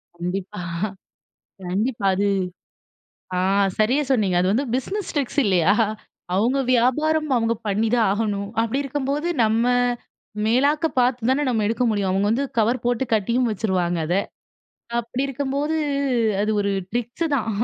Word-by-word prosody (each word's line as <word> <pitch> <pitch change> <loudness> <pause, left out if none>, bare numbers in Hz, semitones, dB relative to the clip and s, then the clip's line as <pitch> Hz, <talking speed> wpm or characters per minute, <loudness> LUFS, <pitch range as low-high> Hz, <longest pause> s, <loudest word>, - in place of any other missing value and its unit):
கண்டிப்பா. 185 +3 -4 1.1
கண்டிப்பா, 215 +3 -1
அது 200 +2 +1 1.1
ஆ - - +2 0.4
சரியா 245 +7 +3
சொன்னீங்க. 205 -8 +2
அது 185 +1 +2
வந்து 255 +7 +1
பிஸ்னஸ் 385 +11 -2
ட்ரிக்ஸ் 285 -1 0
இல்லையா? 185 -2 +3 0.6
அவுங்க 235 +8 +2
வியாபாரம். 305 +6 +2
அவுங்க 230 -1 +1
பண்ணி 210 +2 +1
தான் 230 -3 +3
ஆகணும். 205 -1 -2
அப்டி 230 +4 -1
இருக்கும்போது, 285 +3 -2 0.2
நம்ம, 220 +2 +2 0.8
மேலாக்க 285 +8 +2
பாத்து 245 -1 +2
தானே, 280 +3 +2
நம்ம 225 -4 +1
எடுக்க 230 +3 0
முடியும்! 200 -3 0
அவுங்க 195 +2 +1
வந்து 250 +5 +1
கவர் 230 +3 +2
போட்டு 245 +1 +1
கட்டியும் 235 +4 +1
வச்சுருவாங்க, 185 -5 0
அத. 175 - +1 0.8
அப்பிடி 240 +3 -3
இருக்கும்போது, 280 +3 -2 0.6
அது 210 +1 +1
ஒரு 200 0 0 0.2
ட்ரிக்ஸு 240 +7 -2
தான். 225 -4 -1
230 Hz, 135 wpm, -22 LUFS, 205-265 Hz, 1.1 s, சரியா